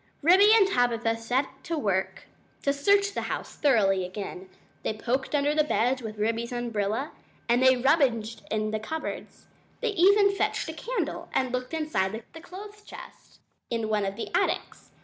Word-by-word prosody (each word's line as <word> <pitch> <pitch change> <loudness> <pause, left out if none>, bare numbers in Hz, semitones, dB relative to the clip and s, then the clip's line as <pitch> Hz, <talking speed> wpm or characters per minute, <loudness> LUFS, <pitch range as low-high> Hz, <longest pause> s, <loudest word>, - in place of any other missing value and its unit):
Ribby 380 +6 +7
and 410 -4 +5
Tabitha 235 - +1
set 260 +4 -2
to 330 - -2
work 195 -8 -1 0.4
to 280 - +2
search 400 +8 +3
the - - -2
house - - -5
thoroughly 200 -9 +3
again. 185 0 -7 0.3
They 215 - -2
poked 260 +6 -1
under 290 +1 +2
the 305 0 +3
beds 260 -2 +1
with 220 -2 -7
Ribby's 230 +3 -1
umbrella 235 +2 -2 0.4
and 240 +1 +3
they 260 0 +6
rummaged 245 -5 +1
in 215 0 -1
cupboards. 315 +9 -6 0.3
They - - 0
even 400 +1 +4
fetched - - -1
a - - -4
candle 475 +10 -4
and 260 -1 +1
looked 250 +5 -3
inside 225 -9 -1
a 325 - -10
clothes 415 +4 -11
chest - - -13 0.3
in 230 -2 -2
one 210 -2 +1
of 195 - -4
the 230 - -6
attics. 380 +2 -1
255 Hz, 165 wpm, -27 LUFS, 220-320 Hz, 0.4 s, Ribby